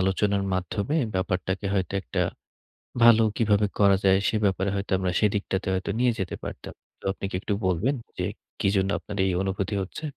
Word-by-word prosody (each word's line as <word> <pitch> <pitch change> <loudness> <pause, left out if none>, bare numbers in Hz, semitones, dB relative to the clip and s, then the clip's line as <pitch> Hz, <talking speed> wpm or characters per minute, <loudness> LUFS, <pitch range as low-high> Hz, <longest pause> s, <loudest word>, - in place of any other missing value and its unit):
আলোচনার 100 +1 +1
মাধ্যমে 100 - -1 0.2
ব্যাপারটাকে 95 +1 -1
হয়তো 95 -1 -1
একটা - - -1 0.8
ভালো 115 -1 +8
কিভাবে 105 -2 +3
করা 100 -1 +6
যায়? 95 0 +5
সে - - +1
ব্যাপারে 95 0 +1
হয়তো 100 +1 -4
আমরা 95 -1 -1
সেদিকটাতে 100 -2 0
হয়তো 95 +2 -2
নিয়ে 125 0 +4
যেতে 95 -2 -2
পারতাম। - - -7 0.3
তো - - -26
আপনি 100 - -6
কি - - -5
একটু 105 - -1
বলবেন 95 - +1 0.2
যে, - - -1 0.3
কি - - +1
জন্য 95 0 +2
আপনার 105 -1 -8
এই 95 - +1
অনুভূতি 95 +1 -2
হচ্ছে? 95 - -7
100 Hz, 175 wpm, -26 LUFS, 95-105 Hz, 0.8 s, ভালো